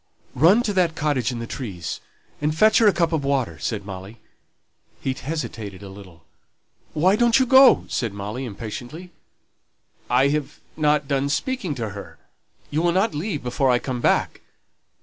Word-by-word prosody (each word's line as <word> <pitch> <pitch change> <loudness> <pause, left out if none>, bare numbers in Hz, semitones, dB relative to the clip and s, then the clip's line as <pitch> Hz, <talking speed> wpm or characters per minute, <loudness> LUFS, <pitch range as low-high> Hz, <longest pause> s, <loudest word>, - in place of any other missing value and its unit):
"Run 180 - +5
to 210 - -1
that 175 -4 +1
cottage 145 -6 0
in 120 - -5
the 115 - -5
trees, 100 - -6 0.4
and 150 +1 -1
fetch 215 +5 +5
her 225 - +5
a - - +7
cup 170 -2 0
of 155 -3 0
water," 130 - -1
said 100 +6 -3
Molly. 100 +3 -9 0.8
He 135 - -2
hesitated 115 - -6
a 100 - -9
little. 95 -4 -14 0.7
"Why 180 +6 +3
don't 235 +1 +4
you 260 - +3
go?" 265 +1 +6
said 115 -4 -2
Molly, 105 +6 -5
impatiently. 120 - -7 1.0
"I 130 +3 +4
have 150 -1 -3 0.2
not 150 -2 +1
done 140 0 0
speaking 190 - -2
to 115 -4 -3
her; 100 0 -10 0.5
you 155 +2 0
will 175 0 +2
not 195 +5 +1
leave 150 0 -3
before 125 +2 0
I 125 - +4
come 125 0 -4
back?" - - +1
140 Hz, 170 wpm, -23 LUFS, 115-170 Hz, 1.0 s, a